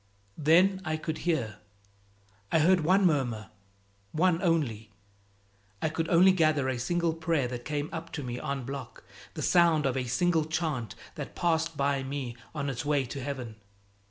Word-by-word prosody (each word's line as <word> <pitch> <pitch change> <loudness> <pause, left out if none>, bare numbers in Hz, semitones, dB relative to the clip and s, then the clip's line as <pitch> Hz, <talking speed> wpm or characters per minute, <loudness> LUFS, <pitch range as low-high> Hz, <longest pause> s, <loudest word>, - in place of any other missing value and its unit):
Then 180 +6 +4
I 155 -2 -1
could 155 0 -4
hear. 120 -11 -1 0.9
I - - +4
heard 180 +4 +5
one 185 +5 +3
murmur, 125 -10 0 0.6
one 170 +1 +2
only. 135 - 0 0.9
I 160 - 0
could 160 +1 -2
only 180 +3 +6
gather 155 -6 +2
a 130 -2 -1
single 170 +5 0
prayer 160 -5 0
that 120 -1 -6
came 150 -1 -2
up 165 0 -6
to 145 - -4
me 125 -1 -4
en 140 -2 -3
bloc, 135 -1 -7 0.3
the - - -4
sound 170 -4 +4
of 135 -1 +1
a 130 -1 -1
single 160 +6 +1
chant 155 - -2 0.2
that - - -7
passed 165 -2 0
by 140 -1 +1
me 130 -3 -4 0.2
on 140 -2 -2
its 135 -2 -3
way 145 -2 +1
to 135 +3 -6
heaven. 125 -5 -5
150 Hz, 165 wpm, -29 LUFS, 130-165 Hz, 0.9 s, only